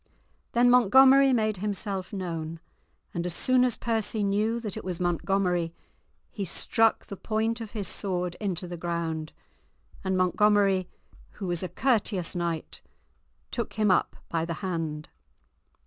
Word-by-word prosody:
Then 240 +1 +4
Montgomery 265 +3 +7
made 215 -4 +1
himself 195 -1 -3
known, 165 -4 -4 0.5
and 170 - -2
as 175 -1 -2
soon 255 -1 +3
as 250 -3 +1
Percy 225 -2 -1
knew 210 +4 +1
that 215 -4 -5
it - - -6
was 180 -2 -4
Montgomery, 175 -1 0 0.6
he 205 - -4
struck 225 +4 +1
the 200 - -7
point 225 +3 -1
of 220 -2 -7
his 205 -4 -3
sword 180 -3 -2
into 185 -4 -3
the 175 0 -6
ground, 165 -2 -3 0.7
and 190 -1 0
Montgomery, 195 0 +3 0.4
who 200 - -6
was 175 -2 -1
a 185 - -3
courteous 200 -4 0
knight, 170 -2 -3 0.7
took 235 - -3
him 215 -2 +2
up 180 - +2
by 165 -1 -1
the 165 0 -3
hand. 160 -4 -3
195 Hz, 145 wpm, -27 LUFS, 175-220 Hz, 0.7 s, Montgomery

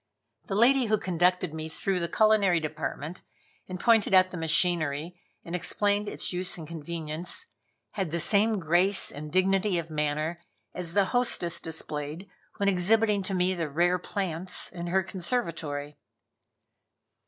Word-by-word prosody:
The 195 - -2
lady 250 +4 +5
who 215 -1 +2
conducted 180 -2 +1
me 160 0 -5
through 185 +3 -1
the 170 - -1
culinary 205 -2 +3
department, 155 +1 -5 0.5
and 185 -1 -6
pointed 225 -3 +4
out 185 0 +5
the - - -6
machinery 165 0 +1 0.2
and 170 - -4
explained 205 +3 0
its - - -3
use 180 +1 -1
and 160 -3 -8
convenience, 165 +1 -6 0.5
had 190 -5 -2
the 170 +2 -2
same 215 +5 +3
grace 180 +3 +2
and 150 +1 -8
dignity 190 +1 +2
of 165 -1 -4
manner 155 +3 -1 0.3
as 175 -2 -4
the 200 -1 +4
hostess 235 -8 +2
displayed 155 +2 -5 0.3
when 200 -2 0
exhibiting 205 +3 +3
to 190 0 -3
me 180 +1 +2
the 165 -4 -3
rare 175 +5 +2
plants 185 -2 -2
in 175 -1 -6
her 190 +2 +2
conservatory. 165 - -4
180 Hz, 145 wpm, -28 LUFS, 160-195 Hz, 0.5 s, lady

